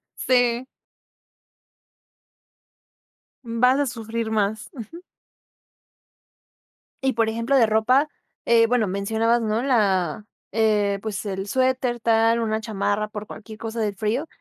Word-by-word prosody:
Sí. 245 -1 +1 2.8
Vas 245 +3 +2
a 285 - +1
sufrir 230 -2 -4
más, 215 +1 -1
ujú. 295 - -10 2.0
Y, 265 0 +2
por 225 -2 +1
ejemplo, 230 +5 0
de 240 -4 +5
ropa, 240 +7 +3 0.4
eh, 230 -1 +5
bueno, 230 -3 +1
mencionabas, 220 +5 +1
¿no?, 220 +1 -1
la, 205 - +1 0.3
eh, 210 -2 +1
pues, 210 -1 -4
el 195 -1 -3
suéter 255 +1 0
tal, 225 0 +3
una 220 -1 -1
chamarra 210 -1 -1
por 210 0 -7
cualquier 220 0 -10
cosa 225 +1 -6
del 210 -2 -1
frío. 220 +9 -1
225 Hz, 115 wpm, -23 LUFS, 215-240 Hz, 2.8 s, de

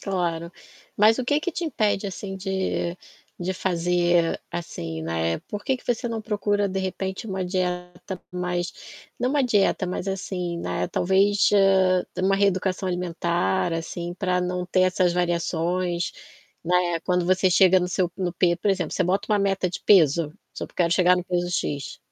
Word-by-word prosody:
Claro. 170 -4 -2 0.5
Mas 215 +4 +5
o 255 - -1
que 290 +4 +2
que 360 +3 -3
te 345 - -3
impede 215 -9 0
assim 195 0 -6
de 190 -2 -2 0.4
de 180 +2 -1
fazer 175 -2 +1
assim, 80 - -5
né. 80 0 -1
Por 205 0 -6
que 265 - +1
que - - -20
você 240 0 -1
não 225 -2 -3
procura, 205 -1 0
de 190 0 -3
repente, 190 +2 -3
uma 190 -2 -3
dieta 180 0 -3
mais 180 -1 -2 0.5
não 250 +2 0
uma 285 0 +2
dieta, 205 -5 +2
mas, 180 +1 -4
assim, 180 -3 -3
né, - - -2
talvez, 195 +3 +3
hã, 190 -2 +4 0.2
uma 195 +1 +3
reeducação 190 -1 +1
alimentar, 175 0 0
assim, 170 +1 -4
pra 180 -1 0
não 180 0 -2
ter 185 +1 +2
essas 185 -1 +2
variações, 175 0 -1 0.5
né. 175 -1 +1
Quando 180 +1 0
você 185 0 +3
chega 185 +1 +5
no 180 - -1
seu 180 -1 0
no 180 -2 -2
p 175 0 +2
por 200 +4 0
exemplo, 185 -5 -1
você - - +1
bota 195 +4 0
uma 210 - +3
meta 195 -2 +1
de 175 - -6
peso, 165 -5 +4 0.2
"Sop - - -6
quero 170 -2 +2
chegar 180 0 +4
no 180 - -3
peso 175 -1 -1
X". 145 -5 -3
180 Hz, 170 wpm, -24 LUFS, 175-195 Hz, 0.5 s, Mas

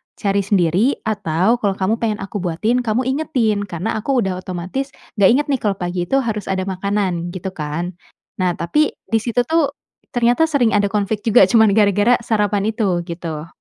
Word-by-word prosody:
cari 200 -1 0
sendiri 195 - +1
atau 205 +1 +1
kalau 200 -4 0
kamu 200 +4 0
pengen 220 -2 -1
aku 195 +1 -5
buatin 195 +8 0
kamu 225 +3 +1
ingetin 240 -8 0
karena 185 +6 -3
aku 255 +2 +1
udah 185 -1 -2
otomatis 185 +9 -4 0.3
enggak 195 - +6
inget 295 +2 0
nih 265 - +1
kalau 205 -2 +2
pagi 175 -1 -3
itu 270 - 0
harus 215 -3 -3
ada 190 -1 -1
makanan." 190 -2 -2
Gitu 185 +1 -5
kan. 165 +2 -4 0.5
Nah, 180 -2 +1
tapi 300 - +1 0.2
di 225 - +1
situ 245 0 +1
tuh 320 -4 +2 0.4
ternyata 245 +6 +3
sering 280 -8 +2
ada 205 - +2
konflik 210 0 -1
juga 225 - +5
cuman 220 -3 +5
gara-gara 205 +3 +4
sarapan 210 -2 0
itu, 195 -6 0
gitu. 165 -3 -6
205 Hz, 175 wpm, -19 LUFS, 185-230 Hz, 0.5 s, enggak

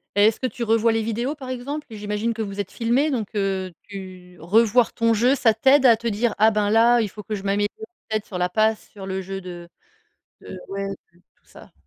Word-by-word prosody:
Et 205 +1 +6
est-ce 220 - +1
que 260 - 0
tu 245 - -6
revois 225 0 +3
les 225 0 0
vidéos, 235 +6 -2
par 270 -4 -10
exemple? 270 +4 -5
J'imagine 210 +1 -3
que 225 - -3
vous 200 -1 -5
êtes 200 - -4
filmés, 245 +6 +1
donc 230 -7 -2
heu, 195 -2 -1 0.2
tu 185 -2 -10
revoir 225 +7 +3
ton 230 0 +2
jeu, 245 +5 +3
ça 235 -5 +3
t'aide 265 +5 +4
à 235 -2 +7
te 235 +2 -9
dire: 225 +1 0
«Ah 215 +2 +6
ben 210 -1 0
là, 235 +2 +5
il 220 - 0
faut 210 +2 -10
que 215 - -5
je 200 - -5
m'améliore 200 +1 0 0.4
peut 220 - +1
être 215 - -4
sur 190 - -7
la 180 0 0
passe, 215 +2 0
sur 195 -2 -10
le 190 0 -3
jeu 195 +1 -6
de 175 -2 -9 0.7
de» 185 - -9
ouais 195 0 -4 0.2
t 170 - -26 0.2
tout - - -41
ça. - - -16
215 Hz, 240 wpm, -23 LUFS, 195-235 Hz, 0.7 s, à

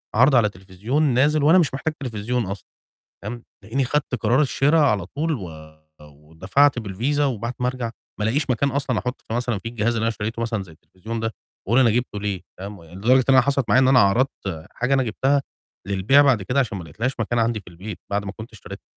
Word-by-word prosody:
عَرْض 130 +4 +5
على 115 -3 +4
تليفزيون 100 - -3
نازل 145 +2 +3
وأنا 165 +5 +6
مش 160 -6 +2
محتاج 155 +3 -2
تليفزيون 120 -2 -2
أصلًا 100 +1 -6 0.6
تمام، 120 +3 -6 0.2
تلاقيني 115 +7 -1
خَدت 135 0 -1
قرار 120 +5 +2
الشِرا 145 +2 +2
على 105 - +2
طول 155 - -2
و 100 -11 -5 0.5
ودفعت 80 - 0
بالvisa 115 +8 -2
وبعد 120 -3 -1
ما 125 - 0
أرجع 125 -3 -3 0.3
ما 105 - -1
ألاقيش 135 +7 0
مكان 130 +3 +1
أصلًا 135 -4 -1
أحُط 125 0 -5
في - - -7
مثلًا 120 -2 -1
في 115 - -7
الجهاز 115 -1 -2
اللي 115 - -2
أنا - - +2
اشتريته 110 +1 -4
مثلًا 115 -3 -2
زي 85 - -14
التليفزيون 105 +8 -8
ده 115 0 -2 0.3
وأقول 120 +5 +4
أنا 120 - +5
جِبته 115 -2 -1
ليه 100 -2 -3 0.2
فاهِم، 100 +2 -7
ويعني 85 +2 -15
لدرجة 125 +6 +4
إن 135 - +6
أنا 130 - +8
حصلت 140 -1 0
معايا 130 - +5
إن 130 - +4
أنا 130 -1 +6
عَرضْت 100 - 0
حاجة 125 +3 -1
أنا 135 - +3
جِبتها 135 +5 +1 0.5
للبيع 100 +9 +4
بعد 135 -7 +3
كده 125 +7 0
عشان 115 -6 -1
ما 90 - -6
لقيتلهاش 115 - -3
مكان 115 +1 0
عندي 115 -1 +1
في 100 - -20
البيت 90 +4 -8
بعد 100 0 -1
ما 95 - -4
كنت 110 +3 -10
اشتريتها، 105 - -10
115 Hz, 220 wpm, -22 LUFS, 100-135 Hz, 0.6 s, أنا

